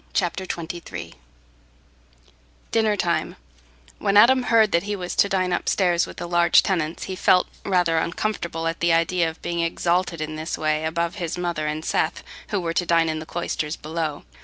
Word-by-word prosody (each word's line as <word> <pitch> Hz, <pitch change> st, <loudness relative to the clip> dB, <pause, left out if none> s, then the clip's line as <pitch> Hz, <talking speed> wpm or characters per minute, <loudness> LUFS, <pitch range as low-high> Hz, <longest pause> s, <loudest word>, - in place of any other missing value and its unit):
Chapter 185 Hz, 0 st, -1 dB
XXIII 160 Hz, -, -6 dB, 1.6 s
Dinner 220 Hz, -2 st, +2 dB
Time 170 Hz, -2 st, -1 dB, 0.6 s
When 200 Hz, -1 st, +2 dB
Adam 255 Hz, +5 st, +7 dB
heard 225 Hz, -3 st, +4 dB
that 170 Hz, -, +3 dB
he 205 Hz, +2 st, -3 dB
was 180 Hz, -2 st, -5 dB
to 200 Hz, -, +4 dB
dine 185 Hz, -2 st, 0 dB
upstairs 175 Hz, -1 st, +1 dB
with -, -, -11 dB
the 175 Hz, -, -4 dB
large 175 Hz, 0 st, +4 dB
tenants, 165 Hz, -4 st, -1 dB
he 190 Hz, -, -5 dB
felt 180 Hz, 0 st, +3 dB, 0.2 s
rather 175 Hz, -4 st, +2 dB
uncomfortable 170 Hz, -2 st, -2 dB
at 165 Hz, 0 st, -2 dB
the 170 Hz, 0 st, +2 dB
idea 165 Hz, 0 st, +2 dB
of 160 Hz, -, -11 dB
being 170 Hz, 0 st, -2 dB
exalted 170 Hz, +1 st, 0 dB
in 155 Hz, 0 st, -4 dB
this 155 Hz, +1 st, -4 dB
way 155 Hz, 0 st, 0 dB
above 170 Hz, +3 st, -2 dB
his 175 Hz, -2 st, -3 dB
mother 170 Hz, -4 st, -2 dB
and 155 Hz, +1 st, -3 dB
Seth, -, -, 0 dB, 0.2 s
who 205 Hz, -, -1 dB
were 165 Hz, -2 st, -2 dB
to 175 Hz, -, 0 dB
dine 165 Hz, -1 st, +3 dB
in 155 Hz, 0 st, -2 dB
the 155 Hz, -, -9 dB
cloisters 160 Hz, -2 st, -3 dB
below. 155 Hz, -1 st, -4 dB
170 Hz, 180 wpm, -23 LUFS, 160-185 Hz, 1.6 s, Adam